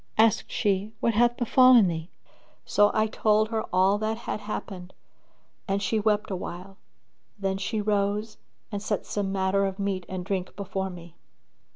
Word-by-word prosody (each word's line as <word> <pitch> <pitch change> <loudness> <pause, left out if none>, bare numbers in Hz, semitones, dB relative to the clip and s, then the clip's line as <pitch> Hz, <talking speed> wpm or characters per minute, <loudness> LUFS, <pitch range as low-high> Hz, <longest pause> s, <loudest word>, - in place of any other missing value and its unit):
Asked 220 -1 +3
she, 205 +1 0
"What 230 - +1
hath 240 +2 +3
befallen 250 -1 +6
thee?" 165 0 -4 0.6
So 205 0 +4
I 215 - +2
told 215 0 +2
her 225 -1 -2
all 190 +3 +3
that 220 +1 -1
had 230 - -4
happened 195 -3 -7 0.7
and 195 0 0
she 200 +2 0
wept 210 -1 0
awhile, 185 +1 -6 0.6
then 195 -1 -2
she 215 +2 -2
rose 210 +1 -1 0.3
and 205 -1 -3
set 210 -1 -2
some 200 -2 -2
matter 195 0 +1
of 195 -1 -2
meat 195 -3 -2
and 185 -1 -5
drink 190 -2 -3
before 190 -1 -3
me. 170 -2 -12
200 Hz, 160 wpm, -26 LUFS, 190-215 Hz, 0.7 s, befallen